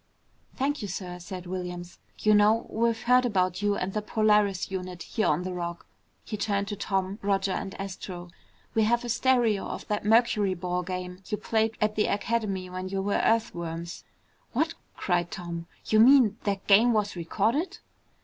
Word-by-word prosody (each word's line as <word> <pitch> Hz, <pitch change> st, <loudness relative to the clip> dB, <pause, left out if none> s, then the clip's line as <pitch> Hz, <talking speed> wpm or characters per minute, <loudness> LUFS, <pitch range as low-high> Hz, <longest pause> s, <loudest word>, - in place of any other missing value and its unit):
"Thank 285 Hz, +2 st, -1 dB
you, 205 Hz, -, -3 dB
sir," 180 Hz, -2 st, -5 dB
said 180 Hz, 0 st, -7 dB
Williams. 180 Hz, -1 st, -6 dB, 0.2 s
"You 215 Hz, -, +3 dB
know, 210 Hz, +2 st, +4 dB
we've 230 Hz, 0 st, 0 dB
heard 250 Hz, +1 st, +5 dB
about 185 Hz, -6 st, 0 dB
you 205 Hz, 0 st, +2 dB
and 190 Hz, 0 st, -3 dB
the 215 Hz, -, -1 dB
Polaris 210 Hz, -3 st, +2 dB
unit 180 Hz, -2 st, -5 dB
here 220 Hz, -, -1 dB
on 155 Hz, +4 st, +1 dB
the 185 Hz, 0 st, -4 dB
Rock." 170 Hz, -1 st, -5 dB, 0.4 s
He 215 Hz, -, -4 dB
turned 200 Hz, -1 st, -1 dB
to 205 Hz, -, -3 dB
Tom, 195 Hz, 0 st, -2 dB
Roger, 200 Hz, -1 st, +1 dB
and 195 Hz, -, -4 dB
Astro. 180 Hz, -2 st, -6 dB, 0.4 s
"We 225 Hz, -, +3 dB
have 235 Hz, +2 st, +1 dB
a -, -, -4 dB
stereo 235 Hz, -4 st, +2 dB
of -, -, -6 dB
that 210 Hz, 0 st, -1 dB
mercuryball 195 Hz, -6 st, +2 dB
game 180 Hz, 0 st, -5 dB
you 210 Hz, -, -2 dB
played 220 Hz, +1 st, 0 dB
at 215 Hz, 0 st, +1 dB
the 215 Hz, -, +2 dB
Academy 205 Hz, -3 st, -1 dB
when 185 Hz, +1 st, -5 dB
you 195 Hz, 0 st, -2 dB
were 200 Hz, +1 st, +1 dB
Earthworms." 170 Hz, -7 st, -1 dB, 0.5 s
"What?" 320 Hz, +6 st, +1 dB, 0.2 s
cried 175 Hz, -2 st, 0 dB
Tom. 170 Hz, -2 st, -6 dB, 0.2 s
"You 215 Hz, -, +3 dB
mean 240 Hz, -3 st, +6 dB
that 200 Hz, -1 st, -1 dB
game 225 Hz, +4 st, +6 dB
was 210 Hz, -2 st, 0 dB
recorded?" 225 Hz, -, 0 dB
200 Hz, 170 wpm, -27 LUFS, 180-220 Hz, 0.5 s, mean